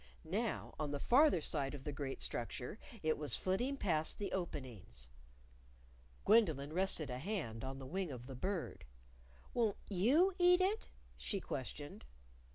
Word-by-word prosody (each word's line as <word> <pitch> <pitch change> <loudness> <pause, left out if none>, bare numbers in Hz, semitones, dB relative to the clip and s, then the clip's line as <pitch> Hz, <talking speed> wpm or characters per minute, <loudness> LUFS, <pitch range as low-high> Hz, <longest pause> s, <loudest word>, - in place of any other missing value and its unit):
Now, 205 +7 -2
on 150 -1 -1
the 145 0 -2
farther 265 - +5
side 145 -2 -1
of 135 - -8
the 150 - -3
great 140 -1 -4
structure, 125 - -3 0.2
it 155 -1 +2
was 145 -6 +2
flitting 245 +10 0
past 160 -9 +1
the 205 - -3
openings. 120 - -5 1.2
Gwendolyn 160 - +4
rested 175 -6 +2
a 125 - -3
hand 145 - -3
on 135 0 -4
the 135 - -7
wing 180 +4 -2
of 125 -2 -7
the 135 - -7
Bird. 180 +7 -3 0.7
"Won't 225 -4 +2
you 275 - +4
eat 355 0 +7
it?" 400 +4 +1 0.3
she 200 - -2
questioned. 145 - -5
160 Hz, 150 wpm, -37 LUFS, 135-210 Hz, 1.2 s, eat